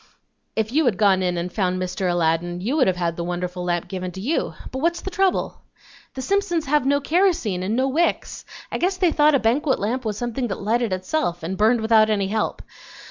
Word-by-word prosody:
If 220 0 -1
you 310 +3 +2
had 225 -7 +2
gone 195 -3 +4
in 180 -1 0
and 175 +1 -4
found 185 -3 0
Mr. 185 0 -2
Aladdin 175 +1 0
you 230 +10 -1
would 280 -8 +3
have 185 - +2
had 170 -2 -1
the 170 - -3
wonderful 180 +1 -4
lamp 175 -1 -1
given 185 -1 -4
to 190 - -8
you; 270 +12 -1 0.2
but 260 - -4
what's 340 +3 0
the 385 - -5
trouble?" 380 0 0 0.5
"The 260 - -4
Simpsons 365 -1 0
have 290 -1 +1
no 285 +1 +3
kerosene 330 - +1
and 200 +4 -1
no 260 +2 +1
wicks. 320 +6 -1 0.3
I - - -2
guess 370 +2 0
they 365 -3 +3
thought 300 -1 +4
a - - +3
banquet 260 +5 +1
lamp 245 +6 -2
was 215 -3 -3
something 240 +2 -2
that 195 - -4
lighted 230 +1 0
itself, 185 - -2
and 180 +4 -3
burned 220 +3 +3
without 220 -1 +4
any 200 -3 0
help. 215 +1 -2
220 Hz, 220 wpm, -22 LUFS, 185-285 Hz, 0.5 s, gone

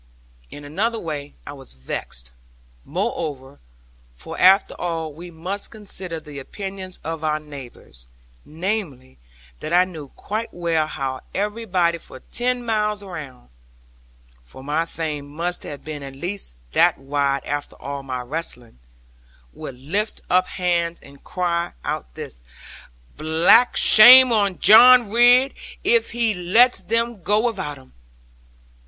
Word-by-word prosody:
In 145 - -11
another 210 +11 -2
way 150 -6 -6
I 145 - -8
was 135 -2 -9
vexed, 60 -1 -6 0.5
moreover 140 -4 -4 0.6
for - - -9
after 190 +2 +5
all 165 -3 -3
we 175 +4 -10
must 180 +5 -4
consider 190 -6 -6
the 150 -2 -10
opinions 190 +4 -7
of 160 0 -5
our 155 0 0
neighbours 130 - -12 0.4
namely, 160 - -5 0.4
that 155 - -6
I 180 +1 +5
knew 160 -6 -9
quite 215 - -6
well 165 -3 -1
how 135 -3 -4
everybody 195 -5 -1
for 130 - -12
ten 245 0 -1
miles 210 -2 -1
round 150 - -10 0.9
(for 60 - -14
my 155 +4 -1
fame 150 -4 -5
must 170 +4 -4
have 145 - -9
been 150 -2 -6
at 135 -1 -9
least 175 - -5 0.2
that - - +3
wide, 140 0 -1
after 145 0 -4
all 140 0 -6
my 130 -2 -5
wrestling), 125 - -6 0.7
would 130 - -9
lift 195 - -3
up 185 +1 +3
hands 170 -2 -1
and 140 0 -17
cry 175 -2 -2
out - - -5
thus - - -9 0.8
'Black 160 +10 +4
shame 250 +3 +9
on 200 -4 +1
John 240 +1 +7
Ridd, 245 +3 +5 0.3
if 455 +4 +3
he 230 -2 0
lets 200 +6 +3
them 230 +2 -1
go 205 +5 +2
without 150 -11 -3
him!' 130 -1 -19
170 Hz, 135 wpm, -21 LUFS, 145-205 Hz, 0.9 s, shame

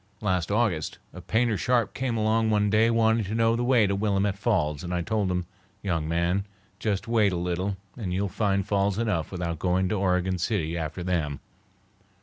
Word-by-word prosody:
Last 95 -5 0
August 105 -7 0 0.2
a - - -9
painter 115 -1 +1
sharp 120 -2 +1
came 125 -3 -2
along 110 +1 +2
one 105 -1 +2
day 110 +2 +4
wanting 115 -1 +3
to 105 +4 -3
know 115 0 +3
the 120 - -1
way 120 -3 +4
to 100 0 0
Willamette 100 -1 +1
Falls, 90 -9 0
and 90 - -5
I 85 - -1
told 105 -1 0
him: 90 -1 -1 0.4
'Young 85 -6 -1
man, 85 +4 +1 0.4
just 105 -1 -1
wait 110 -4 +3
a - - -2
little 90 +3 -2 0.2
and 105 -7 -4
you'll 100 +3 0
find 100 0 0
falls 100 -1 +1
enough 105 -9 -1
without 85 -3 -3
going 90 0 +1
to 105 - 0
Oregon 90 -1 +1
City 85 -4 -1
after 80 +1 -4
them. 80 -6 -1
100 Hz, 190 wpm, -26 LUFS, 90-110 Hz, 0.4 s, day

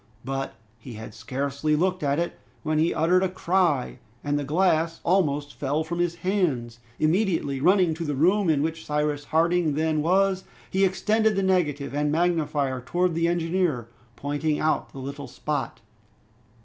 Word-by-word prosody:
But 135 +1 -3 0.2
he 120 +1 -10
had 110 0 -9
scarcely 140 +6 -1
looked 185 +3 0
at 140 0 +1
it, 170 +1 -2 0.2
when 155 -1 0
he 165 +2 +3
uttered 175 +4 +3
a 190 - +1
cry, 175 -7 0 0.2
and 145 0 0
the - - -2
glass 165 +1 +1
almost 150 -6 +1
fell 145 +3 -1
from 170 +2 -4
his 175 -1 0
hands. 135 - 0 0.2
Immediately 160 -5 +1
running 180 +2 +4
to 165 +2 -5
the 150 -3 -2
room 185 +6 +3
in 145 -2 +2
which 160 0 -3
Cyrus 150 -1 -1
Harding 165 -1 +2
then 155 0 +1
was, 190 +3 +2 0.3
he 195 +1 +3
extended 215 +3 +2
the 195 - +1
negative 150 -8 0
and 145 0 0
magnifier 150 -6 0
towards 180 +5 0
the 165 +1 +1
engineer, 170 -7 0 0.3
pointing 145 +3 -1
out 155 0 0
the - - -12
little 140 +1 -6
spot. 150 +4 -4
155 Hz, 160 wpm, -25 LUFS, 145-180 Hz, 0.3 s, running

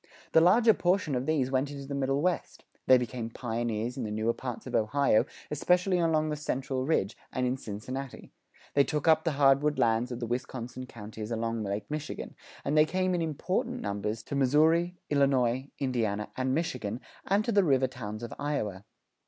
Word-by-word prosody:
The 160 - +6
larger 220 +6 +6
portion 180 -5 +1
of 125 +1 -1
these 140 -5 +1
went 135 +1 +1
into 140 -1 -7
the 140 - -5
Middle 140 +1 0
West; 180 -1 -2 0.2
they 130 - +8
became 120 -1 -3
pioneers 115 0 -3
in 130 - -2
the 110 - -3
newer 110 +2 0
parts 125 -2 -6
of - - -7
Ohio, 110 +1 +3 0.3
especially 180 +5 +2
along 155 -2 +2
the 150 - -1
central 135 -2 -2
ridge, 110 -10 +1 0.2
and 125 - -1
in 125 +1 +1
Cincinnati; 130 +3 -7 0.4
they 140 - +5
took 150 +2 -2
up 160 -1 +5
the 165 - 0
hardwood 140 +1 +4
lands 115 +2 +2
of 120 - -4
the 120 - -2
Wisconsin 125 +1 -4
counties 110 -2 -8
along 115 0 -2
Lake 100 0 -3
Michigan; 150 0 -5 0.3
and 140 - 0
they 155 0 +6
came 185 +1 0
in 175 - 0
important 185 - -2
numbers 105 - -3
to 140 - -8
Missouri, 160 +6 +3
Illinois, 135 -2 +2
Indiana, 115 -6 -1
and 130 0 0
Michigan, 125 -9 -2 0.3
and 200 +2 +2
to 235 - 0
the 200 -2 +4
river 135 -5 +3
towns 115 -4 -6
of 120 - -5
Iowa. 105 -10 -2
130 Hz, 185 wpm, -29 LUFS, 115-155 Hz, 0.4 s, they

